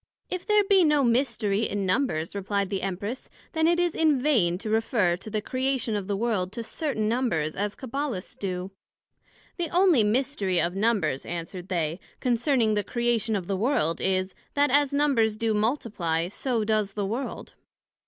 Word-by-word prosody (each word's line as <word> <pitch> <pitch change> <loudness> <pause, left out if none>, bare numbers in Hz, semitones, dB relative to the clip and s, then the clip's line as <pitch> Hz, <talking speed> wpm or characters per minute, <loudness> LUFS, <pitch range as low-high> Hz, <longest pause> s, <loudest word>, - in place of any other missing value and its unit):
If 365 -1 -4
there 420 -1 +5
be 390 -2 +5
no 300 -3 +4
mystery 230 -4 +1
in 200 -1 -2
Numbers, 185 - 0
replied 200 0 -2
the 195 - -1
Empress 200 +6 -4 0.2
then 320 -1 +2
it 345 +1 +3
is 350 -2 +1
in 310 -4 +3
vain 225 - +2
to 215 +3 -5
refer 220 -5 +2
to 205 - -9
the 215 -1 -2
Creation 255 -3 -1
of 200 -2 -3
the 200 -1 -1
World 205 -5 0
to 235 0 -4
certain 225 -2 -2
Numbers, 215 -11 0
as 205 0 -2
Cabbalists 260 -6 -4
do. 185 -1 -3 0.9
The 345 -3 -2
onely 350 - +4
mystery 210 -5 +1
of 175 +2 0
Numbers, 195 - +1
answered 175 +1 -6
they, 170 -2 -1 0.2
concerning 240 -2 +2
the 205 -1 +1
Creation 235 -1 0
of 190 -3 -2
the 195 - -1
World, 190 - +1
is, 185 0 0 0.2
that 285 -2 +3
as 285 0 +4
Numbers 275 -7 +2
do 225 0 0
multiply, 210 - 0
so 235 +2 -1
does 210 -2 0
the 205 -1 -2
World. 235 +7 -4
220 Hz, 175 wpm, -26 LUFS, 195-265 Hz, 0.9 s, there